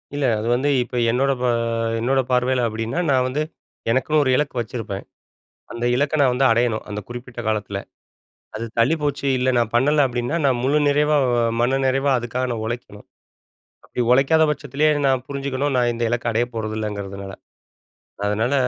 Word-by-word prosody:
இல்ல. 145 -1 0
அது 110 - -3
வந்து 140 +4 0
இப்ப 125 - -9
என்னோட 135 +4 +2
ப - - 0 0.5
என்னோட 135 +4 +1
பார்வையில 125 0 +2
அப்பிடின்னா, 115 +8 -3
நான் 130 -2 +3
வந்து 135 +4 -2 0.5
எனக்குன்னு 150 +5 +2
ஒரு 130 - +1
இலக்கு 145 -1 -1
வச்சிருப்பேன். 110 -3 -5 0.7
அந்த 120 0 -4
இலக்க 145 +4 +1
நான் 130 -3 +4
வந்து 135 +2 +3
அடையணும். 115 -1 +1
அந்த 105 0 -4
குறிப்பிட்ட 120 0 -8
காலத்தில. 105 -2 -2 0.8
அது 115 - -4
தள்ளிப்போச்சு. 145 +2 +1
இல்ல 130 +1 +1
நான் 115 -2 +1
பண்ணல, 145 +4 +4
அப்பிடின்னா, 120 +6 -2
நான் 130 -3 +2
முழு 140 +3 +2
நிறைவா, 150 +1 +3 0.4
மன 130 +3 +2
நிறைவா 135 +1 +1
அதுக்காக 120 +2 -2
நான் 115 -2 -3
உழைக்கணும். 110 -3 -6 0.8
அப்பிடி 125 - -3
உழைக்காத 140 +5 +4
பட்சத்திலயே 145 +1 0 0.2
நான் 130 -2 +1
புரிஞ்சுக்கணும். 140 0 -2
நான் 120 -1 +2
இந்த 120 - -3
இலக்க 120 +1 -2
அடையப் 120 +2 -1
போறதில்லைங்கறதுனால. 105 -3 -4 0.9
அதனால 110 +6 0
125 Hz, 155 wpm, -22 LUFS, 115-140 Hz, 0.9 s, நான்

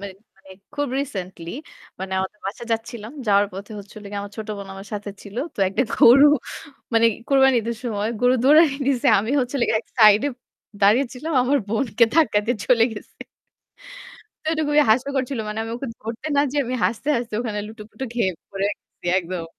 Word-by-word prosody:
মানে 195 -1 -7 0.2
মানে 195 0 -19 0.2
খুব 290 -2 -1
রিসেন্টলি। 185 -10 -6 0.5
মানে 190 0 -5
আমাদের 190 +3 -4
বাসায় 230 +4 -6
যাচ্ছিলাম। 225 +1 -5
যাওয়ার 205 0 +4
পথে 200 +3 -8
হচ্ছিলো 205 +1 -12
গিয়ে 205 - -4
আমার 200 0 -9
ছোট 215 0 -6
বোন 200 -1 -8
আমার 195 +1 -10
সাথে 205 0 -5
ছিল। 205 +1 -12 0.2
তো - - -28
একটা 195 - 0
গরু 270 +5 +7 0.7
মানে 230 0 +5 0.2
কুরবানী 265 -2 +4
ঈদের 230 0 -4
সময় 215 -3 -2
গরু 250 0 +4
দৌড়ানি 300 +1 +6
দিছে। 270 0 +1
আমি 220 +6 -3
হচ্ছিলো 250 0 -1
গিয়ে 220 - +2
এক - - -39
সাইডে 215 +3 +6 0.5
দাঁড়িয়ে 220 +8 +5
ছিলাম। 305 +6 -5
আমার 280 +3 +2
বোনকে 225 0 +2
ধাক্কা 310 -10 +4
দিয়ে 240 -1 0
চলে 240 -3 +5
গেছে। 210 - -11 1.3
তো - - -13
এটা 315 -1 0
খুবই 295 0 +5
হাস্যকর 265 +3 +2
ছিল। 270 - -3
মানে 210 - -4
আমি 225 - -6
ওকে 270 - -6
ধরতে 225 +6 -6
না 280 - +5
যে 295 - -4
আমি 250 +1 -3
হাসতে, 235 +5 -1
হাসতে 235 -2 -4
ওখানে 220 -4 -3
লুটোপুটো 220 +4 -9
খেয়ে 205 -6 +1 0.2
পড়ে 195 0 -3
গেছি - - -15
একদম। 175 -1 -5
225 Hz, 185 wpm, -22 LUFS, 205-260 Hz, 1.3 s, গরু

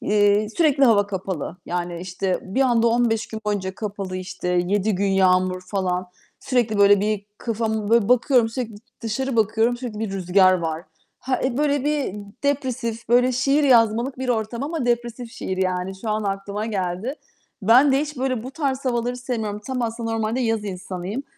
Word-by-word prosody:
eee, 205 0 +3
sürekli 290 -5 +4
hava 205 -4 +4
kapalı. 185 -4 -4
Yani, 175 -1 -3
işte, 185 +1 -2
bir 195 +8 -2
anda 235 -3 +3
15 230 -1 +1
gün 220 - -7
boyunca 190 -2 -1
kapalı 200 -3 -5
işte, 185 -1 -5
7 185 +4 +1
gün 200 +2 0
yağmur 185 -1 +3
falan, 185 -2 -1 0.3
sürekli 235 -5 0
böyle 200 0 +6
bir 210 -1 -1
kafamı 220 -2 -2
böyle 230 -2 +4
bakıyorum, 250 -1 +4
sürekli 230 -2 -4 0.3
dışarı 235 +3 -2
bakıyorum, 225 +2 +2
sürekli 240 -4 -6
bir 215 -2 -3
rüzgâr 185 0 +4
var. 165 -2 -3 0.3
Ha 260 -1 -2
eee, 260 0 -1
böyle 290 -2 +1
bir 295 -8 0 0.3
depresif, 255 -5 -2
böyle 250 +2 +4
şiir 275 +3 +2
yazmalık 235 0 +3
bir 260 -1 -3
ortam 230 +1 -1
ama 295 -3 -2
depresif 240 0 -2
şiir 190 - -4
yani, 185 0 -1
şu 220 - -3
an 215 0 0
aklıma 200 +2 -3
geldi. 195 +5 -2 0.5
Ben 255 +7 +6
de 270 - +4
hiç 300 -1 -4
böyle 255 -3 -1
bu 260 - -7
tarz 275 -2 -2
havaları 245 -1 -1
sevmiyorum. 225 -4 -3
Tam 260 -2 -2
aslında 230 0 -3
normalde 225 +2 -1
yaz 225 -3 0
insanıyım. 185 +4 -5
220 Hz, 170 wpm, -23 LUFS, 195-250 Hz, 0.5 s, böyle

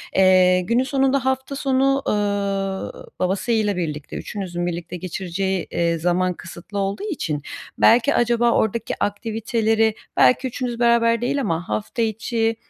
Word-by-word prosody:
Eee, 185 -1 +5
günün 235 +8 +1
sonunda 270 0 +1
hafta 265 +1 -1
sonu, 270 0 +2
ııı, 200 - -2
babasıyla 205 +2 0
birlikte, 155 -4 -4
üçünüzün 175 -4 -4
birlikte 175 0 -4
geçireceği, 185 +1 -3
eee, 170 -1 +1
zaman 180 +2 +1
kısıtlı 175 +4 -8
olduğu 195 - -2
için 170 - -3 0.4
belki 245 +5 +5
acaba 240 0 +3
oradaki 220 +1 0
aktiviteleri, 220 +1 0 0.2
belki 260 +1 +4
üçünüz 245 -1 -4
beraber 235 -1 +3
değil 280 +3 0
ama 175 -7 -2
hafta 215 +2 -2
içi 225 +1 0
210 Hz, 130 wpm, -22 LUFS, 185-240 Hz, 0.4 s, Eee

